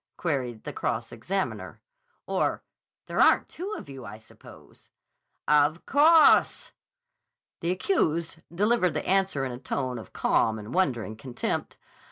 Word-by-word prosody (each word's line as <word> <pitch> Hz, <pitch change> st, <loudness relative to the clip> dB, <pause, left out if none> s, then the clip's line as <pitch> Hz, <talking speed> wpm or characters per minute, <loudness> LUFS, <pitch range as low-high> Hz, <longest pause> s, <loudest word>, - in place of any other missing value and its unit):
queried 130 Hz, -9 st, -2 dB
the -, -, -6 dB
cross -, -, -3 dB
examiner. 190 Hz, +12 st, -4 dB, 0.5 s
"Or—there -, -, -4 dB
aren't -, -, +5 dB
two 375 Hz, +5 st, -7 dB
of -, -, -10 dB
you, 135 Hz, -2 st, -9 dB
I 110 Hz, -, -9 dB
suppose." 110 Hz, -, -17 dB, 0.6 s
"Of 150 Hz, +2 st, +3 dB
cawse!" 310 Hz, +3 st, +5 dB, 0.9 s
The 170 Hz, -, -2 dB
accused 170 Hz, -, 0 dB
delivered 190 Hz, -2 st, +1 dB
the 150 Hz, -, -2 dB
answer 190 Hz, -7 st, +1 dB
in 130 Hz, -, -4 dB
a 120 Hz, -, -7 dB
tone 130 Hz, -2 st, -3 dB
of 110 Hz, -, -12 dB
calm 110 Hz, -1 st, +1 dB
and 105 Hz, +2 st, -8 dB
wondering 120 Hz, -12 st, 0 dB
contempt. 120 Hz, +2 st, -4 dB
150 Hz, 130 wpm, -27 LUFS, 125-190 Hz, 0.9 s, aren't